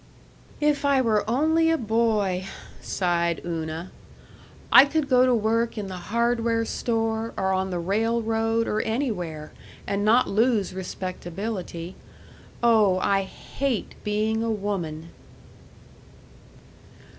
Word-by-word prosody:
"If 295 -1 +1
I 280 -1 +3
were 220 -4 +2
only 320 +6 +2
a 325 - +3
boy," 215 -5 0 0.4
sighed 170 -2 0
Una, 165 +1 -4 0.8
"I - - +10
could 300 0 -1
go 255 -1 +4
to 250 - +4
work 230 +1 0
in 200 -2 -4
the 185 - -6
hardware 230 0 +1
store 225 -1 -2
or 190 0 +1
on 190 0 -1
the 180 - -3
railroad 225 +4 0
or 215 - 0
anywhere, 180 - -3 0.3
and 200 0 -1
not 230 +4 +4
lose 220 -2 +1
respectability. 185 -1 -5 0.7
Oh, 215 -5 +4
I 195 +1 +2
hate 245 +5 -4
being 215 +1 0
a 230 - -1
woman." 180 -7 -3
220 Hz, 115 wpm, -25 LUFS, 185-235 Hz, 0.8 s, I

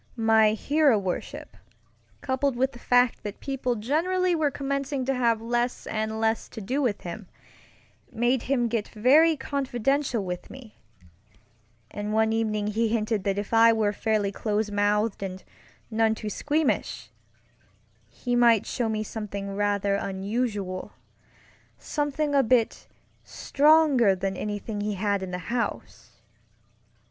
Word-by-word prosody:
My 220 -2 +4
hero 285 +2 +3
worship, 190 -3 -5 0.7
coupled 265 0 0
with 260 +2 +1
the 240 - -13
fact 245 0 +2
that 205 - -7
people 260 -3 -2
generally 350 - 0
were 315 -3 +1
commencing 275 -1 -3
to 270 - +1
have 235 -3 +1
less 240 +1 -1
and 220 0 -3
less 225 0 0
to 225 - -8
do 255 +8 -2
with 230 -7 -1
him, 180 +3 -7 0.8
made 240 +2 +1
him 245 -3 +2
get 225 -2 -2
very 295 +9 +4
confidential 265 -3 -1
with 180 -1 -5
me; 250 -5 -13 1.1
and 210 +1 -4
one 220 0 +2
evening 215 -2 -1
he 220 +2 0
hinted 215 -2 -1
that 195 0 0
if 205 +2 -4
I 230 0 +6
were 215 -2 +1
fairly 210 -2 0
close 210 0 -2
mouthed 205 +1 +1
and 190 -1 -6 0.5
none 220 0 +2
too 215 -1 -5
squeamish, 300 +5 -1 1.0
he 245 -1 -3
might 235 -3 +4
show 235 -2 -2
me 215 -1 -1
something 200 -2 -6
rather 205 -1 +1
unusualŌĆösomething 220 +8 -4
a 275 - +6
bit 240 -2 +1 0.4
stronger 285 -8 +3
than 190 +1 -3
anything 205 +1 -4
he 210 0 -2
had 200 0 0
in 190 - -5
the 180 - -3 0.2
house. 240 -1 -5
225 Hz, 135 wpm, -26 LUFS, 205-260 Hz, 1.1 s, I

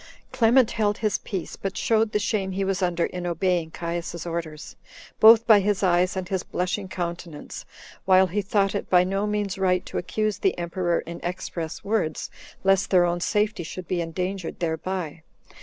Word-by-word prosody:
Clement 235 +1 +4
held 210 -2 0
his 215 -2 0
peace, 190 -4 -5
but 195 -1 -5
showed 220 -1 +2
the - - +1
shame 200 -2 -1
he 195 +1 -1
was 195 0 -1
under 175 -2 +1
in 180 -1 -5
obeying 175 -1 0
Caius's 170 0 -5
orders, 165 -3 -5 0.4
both 225 +1 +8
by 220 -3 +7
his 200 0 0
eyes 180 +1 +2
and 185 -1 -3
his 190 -1 -1
blushing 190 +2 -3
countenance, 170 -4 -6 0.4
while 190 0 +6
he 190 +3 -1
thought 195 0 +1
it - - -4
by 180 -1 +5
no 195 +3 -1
means 205 -2 -2
right 180 -1 +1
to - - -3
accuse 215 +3 -2
the 390 - +1
emperor 175 0 -1
in 170 +1 -8
express 175 -2 -5
words, 200 -7 -1 0.3
lest 195 0 +3
their 180 -2 +5
own 175 0 0
safety 210 +2 0
should 175 +2 -7
be 180 -2 -1
endangered 180 +2 -4
thereby. 165 -1 -3
185 Hz, 175 wpm, -25 LUFS, 175-205 Hz, 0.4 s, both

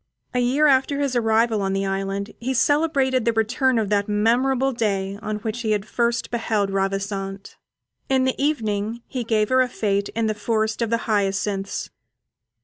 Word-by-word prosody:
A 250 - +1
year 260 +5 +2
after 280 0 +3
his 280 -3 0
arrival 225 -1 +2
on 195 0 -1
the 195 0 0
island 195 +1 -3
he 260 +3 -2
celebrated 275 -3 +2
the 230 +1 +1
return 245 +3 +1
of 215 -3 0
that 205 0 +1
memorable 250 +5 +2
day 200 -4 -1
on 215 0 -3
which 220 +2 -4
he 220 -2 +1
had 205 -1 -1
first 235 +1 -1
beheld 220 -4 0
Ravissante. 195 0 -3 0.6
In 265 -1 +3
the 260 +1 -1
evening 225 -5 -1
he 255 -3 -4
gave 215 -2 +1
her 255 0 +4
a 255 - +1
fête 200 -3 -1
in 230 0 0
the 215 - +1
forest 220 +1 -1
of 230 -1 0
hyacinths. 200 -3 -1
220 Hz, 170 wpm, -23 LUFS, 200-250 Hz, 0.6 s, her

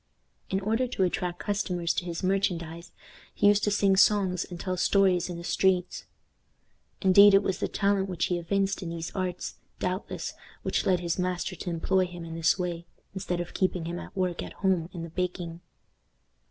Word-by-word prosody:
In 190 - 0
order 225 +5 +1
to 235 -6 -1
attract 180 -1 -1
customers 180 -5 -1
to 175 - -2
his 170 0 -4
merchandise, 175 -3 -1 0.4
he - - +1
used 205 0 +3
to - - +2
sing 200 -1 +3
songs 190 -2 +3
and 175 -1 -9
tell 185 0 -2
stories 185 -1 +3
in 175 - -5
the 170 - -7
streets. 185 0 +1 1.0
Indeed, 200 +1 +8
it 195 - +5
was 190 - -1
the - - 0
talent 200 -1 +1
which 175 -2 0
he 175 -1 -1
evinced 195 +3 0
in 175 - -4
these 165 -1 -5
arts, 185 -2 -3 0.2
doubtless, 185 +2 -3 0.3
which - - 0
led 180 -2 +3
his 170 +1 -2
master 180 -1 -1
to 180 - -5
employ 185 +2 +1
him 175 -1 -8
in 165 - -7
this 165 0 +2
way, 170 -2 -3 0.3
instead 180 -2 -3
of 175 - -5
keeping 185 -3 0
him 170 +1 -4
at - - -10
work 180 -2 0
at - - -7
home 185 -4 0
in 170 -2 -6
the 165 - -8
baking. 175 -1 -3
180 Hz, 190 wpm, -28 LUFS, 175-195 Hz, 1.0 s, Indeed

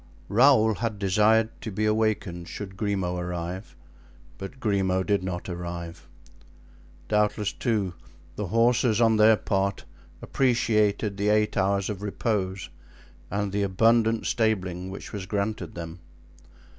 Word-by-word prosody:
Raoul 110 -1 +5
had 110 -1 -3
desired 105 +3 +3
to 110 - -5
be 105 +3 -1
awakened 105 -5 0
should 95 -2 -7
Grimaud 95 -3 -1
arrive, 90 +2 -5 0.6
but 100 +7 -8
Grimaud 95 -5 +1
did 100 -3 +1
not 90 -1 -4
arrive. 85 -1 -6 1.0
Doubtless, 105 -1 +1
too, 105 -7 -1 0.4
the 105 - -3
horses 115 +2 +3
on 115 -2 +4
their 110 0 +6
part 100 0 -1 0.3
appreciated 110 -5 +1
the 105 +1 +1
eight 105 0 +2
hours 100 0 +1
of 100 -3 -5
repose 100 -2 -2 0.6
and 100 0 -2
the 100 +1 -1
abundant 115 +3 +2
stabling 95 -5 0
which 95 - -8
was 100 -2 -5
granted 100 -2 -3
them. 85 0 -7
100 Hz, 125 wpm, -26 LUFS, 95-110 Hz, 1.0 s, their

